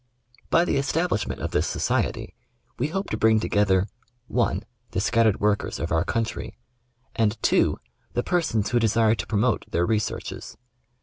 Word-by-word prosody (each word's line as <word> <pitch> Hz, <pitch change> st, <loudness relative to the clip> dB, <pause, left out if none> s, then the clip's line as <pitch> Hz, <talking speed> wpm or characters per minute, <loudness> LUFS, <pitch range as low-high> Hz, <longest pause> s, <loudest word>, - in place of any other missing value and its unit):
By 170 Hz, -, +4 dB
the -, -, +1 dB
establishment 150 Hz, -2 st, -1 dB
of -, -, -3 dB
this -, -, +1 dB
Society -, -, -1 dB, 0.5 s
we 130 Hz, -, +1 dB
hope 195 Hz, +5 st, -3 dB
to 110 Hz, -, -1 dB
bring 110 Hz, 0 st, +4 dB
to -, -, -2 dB
gether 95 Hz, -2 st, +3 dB, 0.2 s
(]) 120 Hz, 0 st, -41 dB, 0.6 s
the 95 Hz, -, -2 dB
scattered 110 Hz, 0 st, +2 dB
workers 105 Hz, 0 st, 0 dB
of 85 Hz, -, -3 dB
our 80 Hz, 0 st, +2 dB
country, 115 Hz, +3 st, -3 dB, 0.6 s
and 110 Hz, 0 st, +1 dB
(2) -, -, +3 dB, 0.4 s
the 120 Hz, -, 0 dB
persons 130 Hz, -, 0 dB
who 120 Hz, -, +3 dB
desire 110 Hz, 0 st, +3 dB
to 100 Hz, -3 st, -4 dB
promote 110 Hz, +2 st, +1 dB
their 85 Hz, +1 st, +1 dB
researches. 105 Hz, +1 st, -3 dB
110 Hz, 160 wpm, -25 LUFS, 105-120 Hz, 0.6 s, By